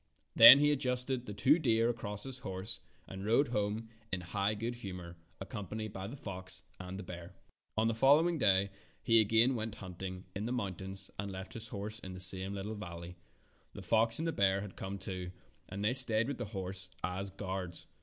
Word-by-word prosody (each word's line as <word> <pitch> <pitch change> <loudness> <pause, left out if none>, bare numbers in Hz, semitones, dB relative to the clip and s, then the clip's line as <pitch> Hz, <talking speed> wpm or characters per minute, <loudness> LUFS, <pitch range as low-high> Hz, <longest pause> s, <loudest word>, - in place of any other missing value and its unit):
Then 115 +4 +12
he 145 +1 +3
adjusted 125 -2 -1
the 105 - -5
two 145 +10 +4
deer 115 -6 +2
across 105 -3 -3
his 130 -1 -4
horse 95 0 -3 0.3
and 95 0 -8
rode 115 +6 +2
home 105 0 -2 0.2
in 95 -2 -1
high 100 +4 -1
good 115 +3 -4
humor, 90 -6 -8 0.2
accompanied 105 0 -6
by 95 0 -6
the 130 +7 -8
fox 95 -5 -5 0.2
and 90 +1 -7
the 100 - -7
bear. 85 -1 -10 0.4
On 110 +1 +2
the 115 - +1
following 150 +8 +4
day 100 -3 +3 0.3
he 115 -2 +5
again 115 +4 +4
went 110 -2 -4
hunt 95 -5 -10
ing 95 -1 -6
in 105 +3 -3
the - - -3
mountains 95 -4 -2
and 100 0 -3
left 95 0 -8
his 115 0 -7
horse 105 0 -6
in 95 -4 -8
the - - -8
same 95 +2 +1
little 100 +2 -5
valley. 85 -4 -8 0.6
The - - -9
fox 115 +1 +4
and 165 - 0
the - - 0
bear 100 -5 +2
had 100 -3 -9
come 95 +1 -6
too, 90 -2 -6 0.4
and 100 +2 -4
they 115 - +2
stayed 115 -3 +7
with 140 -3 -4
the 120 - -3
horse 95 -2 -2
as 95 +2 -3
guards. 95 -3 -6
105 Hz, 200 wpm, -33 LUFS, 95-115 Hz, 0.6 s, Then